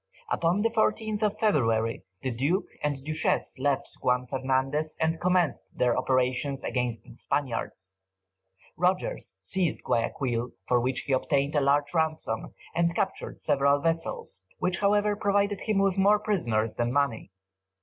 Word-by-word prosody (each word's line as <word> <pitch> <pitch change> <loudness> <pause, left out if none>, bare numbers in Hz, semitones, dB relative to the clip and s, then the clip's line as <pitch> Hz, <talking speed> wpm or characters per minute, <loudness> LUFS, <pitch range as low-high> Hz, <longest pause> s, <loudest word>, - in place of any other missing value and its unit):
Upon 175 - +2
the 230 - +3
14th 220 -1 0
of 210 -1 +1
February, 115 - +1 0.2
the 130 - -1
Duke 145 - 0 0.2
and 145 -2 -2
Duchess 155 -2 0
left 140 0 +1
Juan 125 0 +2
Fernandez, 135 +4 -1
and 160 0 0
commenced 180 -6 0
their 125 -1 +3
operations 130 +2 0
against 125 -3 -2
the - - -14
Spaniards. 115 -8 -3 0.8
Rogers 180 - -1
seized 175 - -1
Guayaquil, 120 0 -1
for 125 - +3
which 130 +2 -1
he 140 - -2
obtained 140 +2 +1
a 145 - +3
large 145 +2 +2
ransom, 155 -9 -1 0.2
and 170 0 +1
captured 190 - -2
several 140 -1 +3
vessels, 165 - -2
which, 180 -1 0
however, 205 +1 +3
provided 200 0 +1
him 215 -2 0
with 195 -1 +2
more 205 +2 +5
prisoners 120 - 0
than 120 0 -1
money. 140 -6 0
145 Hz, 140 wpm, -27 LUFS, 125-185 Hz, 0.8 s, more